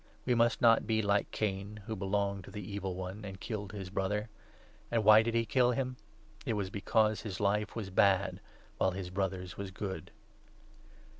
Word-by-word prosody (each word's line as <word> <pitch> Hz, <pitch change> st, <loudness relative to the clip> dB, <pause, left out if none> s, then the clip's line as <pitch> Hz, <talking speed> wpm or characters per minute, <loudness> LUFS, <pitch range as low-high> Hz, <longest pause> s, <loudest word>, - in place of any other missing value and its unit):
We 125 Hz, -, +3 dB
must 120 Hz, 0 st, +3 dB
not 115 Hz, -2 st, +5 dB
be 110 Hz, -1 st, +2 dB
like 100 Hz, 0 st, +2 dB
Cain, 100 Hz, 0 st, -3 dB
who 110 Hz, -1 st, -3 dB
belonged 100 Hz, -1 st, -1 dB
to -, -, -10 dB
the 105 Hz, -3 st, -7 dB
Evil 95 Hz, -2 st, -3 dB
One 95 Hz, +3 st, -6 dB
and 95 Hz, -2 st, -7 dB
killed 105 Hz, -4 st, -5 dB
his 95 Hz, -3 st, -7 dB
brother. 105 Hz, +3 st, -1 dB, 0.6 s
And 115 Hz, -2 st, +1 dB
why 110 Hz, +1 st, +8 dB
did 115 Hz, +1 st, -1 dB
he 115 Hz, 0 st, +2 dB
kill 125 Hz, +3 st, +3 dB
him? 130 Hz, 0 st, -2 dB, 0.5 s
It -, -, -1 dB
was 100 Hz, -3 st, -2 dB
because 110 Hz, +1 st, +2 dB
his 105 Hz, -4 st, -5 dB
life 105 Hz, +1 st, +1 dB
was 105 Hz, -4 st, -4 dB
bad 95 Hz, +1 st, +3 dB, 0.4 s
while 95 Hz, -, +4 dB
his 90 Hz, -1 st, -5 dB
brother's 95 Hz, -1 st, -3 dB
was 100 Hz, -1 st, -4 dB
good. 95 Hz, -3 st, -5 dB
100 Hz, 180 wpm, -32 LUFS, 95-110 Hz, 0.6 s, why